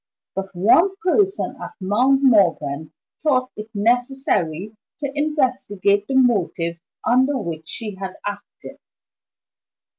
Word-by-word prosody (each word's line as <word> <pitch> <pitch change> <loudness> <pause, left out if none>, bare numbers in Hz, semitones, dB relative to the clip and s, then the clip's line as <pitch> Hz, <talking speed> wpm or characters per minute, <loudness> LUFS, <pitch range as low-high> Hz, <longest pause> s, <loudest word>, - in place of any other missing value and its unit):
But 195 0 -4
one 330 - +4
person 390 +1 +1
at - - -7
Mount 250 +8 +2
Morven 165 - +2 0.3
thought 255 -5 +1
it 215 +1 -8
necessary 220 - 0 0.2
to 280 -2 -3
investigate 255 -9 0
the 265 - -2
motives 185 -9 +1 0.3
under 260 +3 +3
which 165 -7 -6
she 215 -2 -5
had 190 -1 -6
acted. 205 0 -8
220 Hz, 110 wpm, -21 LUFS, 190-270 Hz, 0.3 s, one